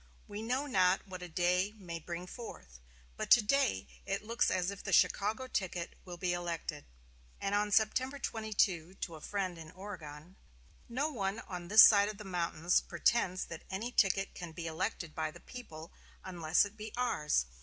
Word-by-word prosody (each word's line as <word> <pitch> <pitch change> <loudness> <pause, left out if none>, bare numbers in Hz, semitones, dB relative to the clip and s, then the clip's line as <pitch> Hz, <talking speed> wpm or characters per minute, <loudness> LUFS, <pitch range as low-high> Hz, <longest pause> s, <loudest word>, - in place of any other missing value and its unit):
We 205 +1 -6
know 250 +5 -1
not 190 -9 +2
what 185 -1 -7
a 180 - -7
day 180 +4 +1
may 170 -4 -6
bring 170 +2 -6
forth, 65 - -10 0.4
but - - -3
to 240 - +8
day 210 - +2 0.2
it 195 +1 -2
looks 230 +2 +1
as 185 0 0
if 200 - -9
the - - -4
Chicago 215 +6 +3
ticket 185 -7 -3
will 175 -1 -7
be 180 0 0
elected." 170 -3 -4 0.5
And 195 - -2
on 210 0 +2
September 240 +6 +2
22, 205 - 0
to 170 - -5
a 155 - -11
friend 185 -3 -3
in 160 -1 -9
Oregon: 175 -3 -9 0.5
"No 280 +6 -1
one 200 -5 -2
on 180 -2 -7
this 215 +4 +10
side 205 -1 +7
of 215 - -6
the 210 - -8
mountains 175 -2 +1
pretends 185 +1 +1
that 165 - -8
any 215 +6 -3
ticket 195 -3 +2
can 175 -2 -8
be 170 0 -6
elected 165 -1 -3
by 155 -1 -1
the - - -12
people, 165 -11 -10 0.3
unless 175 -1 +2
it 205 +1 -10
be 215 0 -7
ours. 150 - +1
185 Hz, 180 wpm, -33 LUFS, 170-215 Hz, 0.5 s, this